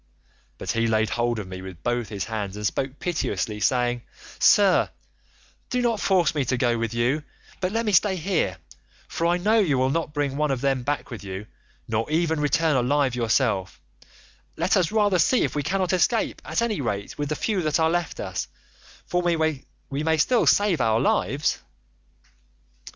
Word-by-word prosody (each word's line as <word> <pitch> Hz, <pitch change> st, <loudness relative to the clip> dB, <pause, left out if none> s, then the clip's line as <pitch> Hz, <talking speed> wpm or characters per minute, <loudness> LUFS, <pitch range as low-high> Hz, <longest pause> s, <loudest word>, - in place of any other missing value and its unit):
But -, -, -3 dB
he 115 Hz, 0 st, +1 dB
laid 110 Hz, -1 st, +1 dB
hold 120 Hz, 0 st, 0 dB
of 105 Hz, -3 st, -5 dB
me 95 Hz, 0 st, -7 dB
with 95 Hz, -2 st, -10 dB
both 120 Hz, -2 st, -1 dB
his 100 Hz, -3 st, -3 dB
hands 105 Hz, -3 st, -4 dB
and 105 Hz, 0 st, -5 dB
spoke 135 Hz, +6 st, -2 dB
piteously, 110 Hz, -, -2 dB
saying, 120 Hz, +2 st, +1 dB, 0.4 s
'Sir, 200 Hz, -3 st, +5 dB, 0.8 s
do 250 Hz, -, 0 dB
not 235 Hz, -3 st, +1 dB
force 185 Hz, -5 st, +2 dB
me 145 Hz, -3 st, 0 dB
to 130 Hz, -, 0 dB
go 120 Hz, -1 st, +2 dB
with 115 Hz, -1 st, -2 dB
you, 120 Hz, +6 st, 0 dB, 0.4 s
but 185 Hz, 0 st, -1 dB
let 230 Hz, +2 st, -1 dB
me 210 Hz, -, +1 dB
stay 195 Hz, +1 st, +4 dB
here, 165 Hz, -, -1 dB, 0.5 s
for 165 Hz, -, -1 dB
I 175 Hz, +1 st, +2 dB
know 215 Hz, +5 st, +3 dB
you 155 Hz, -10 st, +2 dB
will 130 Hz, +1 st, +2 dB
not 165 Hz, 0 st, -1 dB
bring 145 Hz, -2 st, -1 dB
one 150 Hz, 0 st, +1 dB
of 135 Hz, -2 st, 0 dB
them 135 Hz, -2 st, +1 dB
back 145 Hz, +2 st, -3 dB
with 115 Hz, -, -7 dB
you, 95 Hz, +1 st, -6 dB, 0.4 s
nor 110 Hz, +3 st, -1 dB
even 160 Hz, 0 st, +1 dB
return 150 Hz, +1 st, +2 dB
alive 130 Hz, +1 st, +2 dB
yourself; 115 Hz, -5 st, 0 dB, 0.8 s
let 175 Hz, +5 st, +2 dB
us 180 Hz, -4 st, +2 dB
rather 205 Hz, -4 st, +2 dB
see 225 Hz, +10 st, +3 dB
if -, -, -1 dB
we 150 Hz, -, -1 dB
cannot 185 Hz, +3 st, 0 dB
escape 220 Hz, +6 st, +1 dB
at -, -, -1 dB
any 215 Hz, -9 st, -1 dB
rate 100 Hz, -2 st, -4 dB
with 145 Hz, -1 st, -2 dB
the 150 Hz, -, -1 dB
few 205 Hz, +1 st, -1 dB
that 155 Hz, -1 st, 0 dB
are 160 Hz, 0 st, +3 dB
left 175 Hz, -1 st, -2 dB
us, -, -, -4 dB, 0.6 s
for 180 Hz, -, 0 dB
we 160 Hz, -4 st, -2 dB
may 160 Hz, 0 st, +2 dB
still 240 Hz, +10 st, +3 dB
save 205 Hz, -5 st, +3 dB
our 110 Hz, 0 st, +2 dB
lives. -, -, +1 dB
145 Hz, 185 wpm, -24 LUFS, 120-175 Hz, 0.8 s, Sir